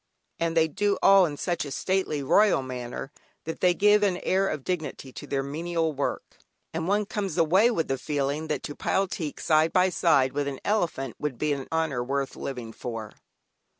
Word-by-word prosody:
And 165 0 0
they 160 0 +5
do 200 +6 0
all 195 -2 +7
in 145 -2 -6
such 175 +2 -1
a 145 - -6
stately, 155 0 -1
royal 200 0 +4
manner, 125 +1 -6 0.3
that 160 - -5
they 180 -1 +3
give 210 +2 +5
an 195 -3 +2
air 190 +1 +2
of 150 -6 -3
dignity 150 -6 -4
to - - -9
the 135 -1 -1
menial 160 +3 -2
work, 140 0 -4 0.4
and 165 +1 -2
one 205 +2 +2
comes 195 -4 -3
away 185 +8 +4
with 165 -10 -1
the 135 -1 -1
feeling 145 +1 -2
that 150 -3 -2
to 145 - -6
pile 195 0 0
teak 155 -5 -5
side 155 +1 +3
by 185 0 +4
side 140 -8 +3
with 145 -1 -1
an 135 -2 -4
elephant 165 - -1
would 150 -5 -3
be 150 +4 0
an 135 -2 -5
honour 160 -6 0
worth 135 +1 -2
living 120 -4 -6
for. 115 -3 -6
155 Hz, 195 wpm, -26 LUFS, 135-180 Hz, 0.4 s, all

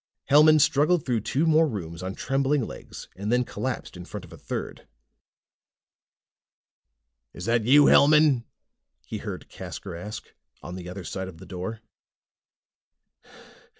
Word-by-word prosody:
Hellman 155 +2 +7
struggled 155 +2 +3
through 120 -3 +1
two 135 +8 0
more 160 0 +4
rooms 85 - -6
on 95 +1 -5
trembling 135 -1 0
legs - - -10
and 100 +3 -3
then 125 +1 +3
collapsed 130 -4 -4
in 90 - -8
front 95 +1 -8
of 90 - -15
a - - -11
third. - - -6 2.5
"Is 90 - -7
that 115 -1 +1
you, 145 +4 +7
Hellman?" 150 -4 +5 0.6
he - - -5
heard - - -7
Casker 95 -4 -8
ask, 100 +4 -8 0.3
from 90 - -9
the 90 -1 -7
other 95 +1 -7
side 95 +2 -5
of 90 -3 -10
the 95 - -12
door. 95 +5 -6
115 Hz, 140 wpm, -26 LUFS, 95-145 Hz, 2.5 s, Hellman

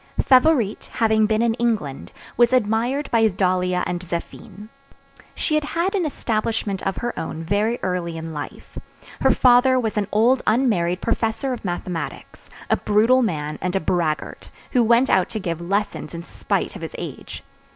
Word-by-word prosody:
Favourite 255 -5 +3
having 220 -1 +2
been 220 +1 +1
in 235 -1 +2
England, 215 - -2 0.2
was 240 +1 +4
admired 245 +4 +1
by 225 -1 +4
Dahlia 180 -2 0
and 175 - -2
Zéphine. 180 +4 -7 0.7
She 310 - -2
had 305 0 +2
had 340 +6 -1
an 370 -6 0
establishment 220 -6 -2
of 195 - -2
her 240 0 -3
own 160 0 -5
very 210 +7 0
early 180 -3 -2
in 160 0 -6
life. 145 -1 -8 0.4
Her - - +3
father 255 +1 +5
was 220 -2 -2
an 205 -2 0
old 240 +5 +3
unmarried 205 -7 +1
professor 230 +3 -1
of 245 - -7
mathematics, 175 -2 -5 0.2
a - - +2
brutal 225 +5 +3
man 155 -9 -2
and 180 +1 -2
a - - +3
braggart, 160 -3 -2 0.2
who 250 -3 +3
went 235 +3 +3
out 190 - +3
to 225 -2 -4
give 170 -4 -4
lessons 195 0 -2
in 170 - -6
spite - - -3
of - - -8
his - - -7
age. - - -8
215 Hz, 165 wpm, -22 LUFS, 180-240 Hz, 0.7 s, father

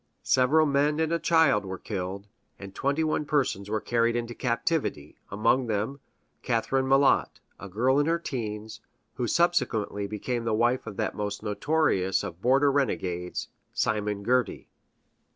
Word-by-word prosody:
Several 140 +5 +4
men 145 +1 +1
and 160 0 +1
a 170 - +1
child 160 -13 +3
were 95 -1 -5
killed, 95 0 -5 0.3
and 100 -1 -10
twenty 140 +7 0
one 155 -1 0
persons 135 -10 -1
were 110 0 0
carried 115 +1 +1
into 120 0 -3
captivity 115 - -2
among 120 +5 +1
them, 110 +6 -2 0.4
Catherine 130 +3 0
Malott, 135 +1 +3 0.2
a 100 - -8
girl 125 +8 +2
in 145 - +1
her 165 +1 +2
teens, 110 -7 -5 0.3
who 125 -2 -2
subsequently 110 - +1
became 115 +4 -3
the 115 -2 0
wife 120 +2 +1
of 105 -3 -7
that - - -1
most 105 0 -4
notorious 105 -4 +1
of 85 +1 -7
border 135 +4 +4
renegades, 90 -10 -2 0.2
Simon 105 -1 -1
Girty. 125 -1 0
120 Hz, 150 wpm, -27 LUFS, 105-140 Hz, 0.4 s, Several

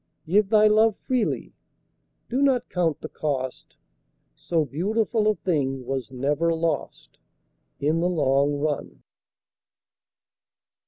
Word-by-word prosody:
Give 195 +4 +2
thy 215 -1 +5
love 215 0 +4
freely; 255 -4 -2 0.7
do 255 +3 -1
not 270 -3 +2
count 170 -5 0
the - - -5
cost; 135 -5 -4 0.6
So 165 -3 -1
beautiful 215 - 0
a 215 - +3
thing 135 -9 -1
was 130 0 -4
never 145 +6 0
lost 160 - -3 0.6
In 155 +3 +1
the 175 +1 +1
long 145 -3 +2
run. 145 0 -3
165 Hz, 110 wpm, -25 LUFS, 140-210 Hz, 0.7 s, thy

